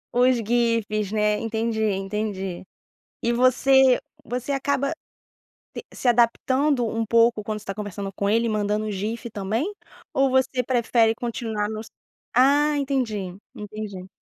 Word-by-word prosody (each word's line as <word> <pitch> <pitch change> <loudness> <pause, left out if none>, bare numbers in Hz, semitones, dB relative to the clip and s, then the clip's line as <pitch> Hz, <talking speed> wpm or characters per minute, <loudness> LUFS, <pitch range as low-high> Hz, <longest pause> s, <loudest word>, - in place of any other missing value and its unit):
Os 250 +1 +4
GIFs, 225 -3 0
né, 210 -1 +2
entendi, 225 0 -2
entendi. 195 -2 -2 0.6
E 235 - +1
você 255 +1 +5 0.2
você 250 +4 -4
acaba 280 +1 0 0.8
t - - -7
se - - -4
adaptando 245 +3 +2
um 225 0 -1
pouco 230 -1 +3
quando 215 +1 -3
você 210 - -11
está 195 - -4
conversando 200 -1 -6
com 200 +1 -1
ele 230 +2 +2
mandando 210 0 -1
GIF, 220 +4 -4
também? 220 - -2 0.4
Ou 270 0 +3
você 260 -1 +1
prefere 235 -2 +2
continuar 225 -3 -3
nos 220 0 -6 0.5
Ah, 290 +4 +4
entendi, 235 -10 -2 0.2
entendi. 210 -3 -7
225 Hz, 130 wpm, -24 LUFS, 210-255 Hz, 0.8 s, você